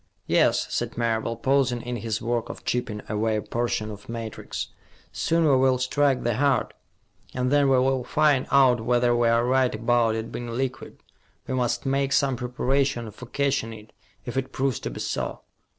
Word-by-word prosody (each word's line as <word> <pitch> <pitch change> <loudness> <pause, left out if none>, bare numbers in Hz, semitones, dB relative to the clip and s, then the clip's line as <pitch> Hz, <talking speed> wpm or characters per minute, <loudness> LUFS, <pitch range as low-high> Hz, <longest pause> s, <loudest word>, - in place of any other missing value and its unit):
"Yes," - - +3
said - - -2
Marable, 115 -1 0
pausing 130 -3 +1
in 120 0 -4
his 110 -2 -3
work 120 0 -1
of - - -9
chipping 110 -4 -2
away 110 +1 0
a 105 - -1
portion 110 -1 -2
of 105 +1 -11
matrix. 115 -2 -5 0.4
"Soon 165 +1 +1
we 140 - +5
will 130 0 +3
strike 135 +1 +1
the 120 -2 0
heart, 140 0 +1 0.6
and 125 0 0
then 145 -1 +4
we 135 - +4
will 130 0 +2
find 150 -1 +2
out 130 -4 +5
whether 120 +1 +2
we 120 0 +3
are 115 +1 +3
right 130 -1 +2
about 115 0 +2
it 110 0 -4
being 120 - -5
liquid. 130 +2 -4 0.5
We - - -4
must 120 -1 -1
make 135 +1 +1
some 135 -2 +2
preparations 125 -1 -1
for 125 +4 -11
catching 135 -4 -1
it, 110 0 -13 0.3
if 120 +1 -5
it 135 0 -2
proves 135 -2 -1
to - - -4
be - - -7
so." - - -3
125 Hz, 180 wpm, -25 LUFS, 115-135 Hz, 0.6 s, we